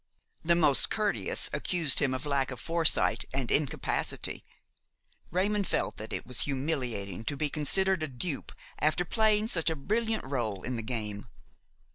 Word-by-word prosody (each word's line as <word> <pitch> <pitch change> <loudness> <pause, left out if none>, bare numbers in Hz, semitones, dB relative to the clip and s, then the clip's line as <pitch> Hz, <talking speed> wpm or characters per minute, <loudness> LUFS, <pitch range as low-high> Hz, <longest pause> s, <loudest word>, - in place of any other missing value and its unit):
The 170 +1 +4
most 150 -5 +2
courteous 210 -1 +2
accused 170 -5 +2
him 130 -2 +1
of 130 +3 -5
lack 140 -2 0
of 130 -3 -6
foresight 165 +3 +2
and 130 -2 -2
incapacity. 145 -2 0 0.9
Raymon 200 +4 0
felt - - -1
that 110 - -7
it - - -4
was 125 - -7
humiliating 130 - -3
to 140 - -3
be 150 -1 -1
considered 190 +5 +4
a 155 - -1
dupe 135 +3 -4 0.3
after 155 +4 +1
playing 215 +2 +2
such 170 -8 +3
a 160 - -1
brilliant 220 +9 -1
rôle 120 -8 -3
in 125 - -3
the 115 - -3
game. 110 -3 -5
145 Hz, 155 wpm, -29 LUFS, 130-180 Hz, 0.9 s, The